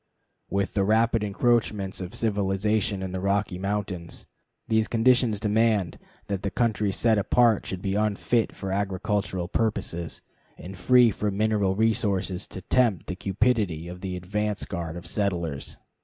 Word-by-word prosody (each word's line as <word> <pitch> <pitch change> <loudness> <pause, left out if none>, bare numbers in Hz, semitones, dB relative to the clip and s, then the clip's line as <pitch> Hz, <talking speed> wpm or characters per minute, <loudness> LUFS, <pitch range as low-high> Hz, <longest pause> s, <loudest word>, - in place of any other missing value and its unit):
With 100 -1 -1
the 100 - +2
rapid 110 +2 +2
encroachments 105 -2 0
of 90 +1 -6
civilization 100 -1 0
in 95 - -4
the 95 - -3
Rocky 100 -1 0
Mountains, 95 -3 -4 0.4
these 110 -1 +2
conditions 120 -2 +3
demand 110 -3 +1 0.3
that 100 -2 -3
the 100 - -1
country 110 -2 0
set 110 +2 +2
apart 115 +2 +3
should 95 -1 -5
be 95 - -1
unfit 110 +2 0
for 95 -1 -5
agricultural 95 -1 -1
purposes, 85 -6 -2 0.3
and 95 +2 -9
free 120 +5 +5
from 100 0 -2
mineral 105 -3 +1
resources 100 -3 0
to 95 - -8
tempt 115 -9 +2
the 90 - -4
cupidity 100 -4 0
of 90 +1 -8
the 95 -2 -4
advance 105 +3 -2
guard 85 -2 -5
of 85 - -9
settlers. 85 -6 -2
100 Hz, 145 wpm, -26 LUFS, 95-110 Hz, 0.4 s, free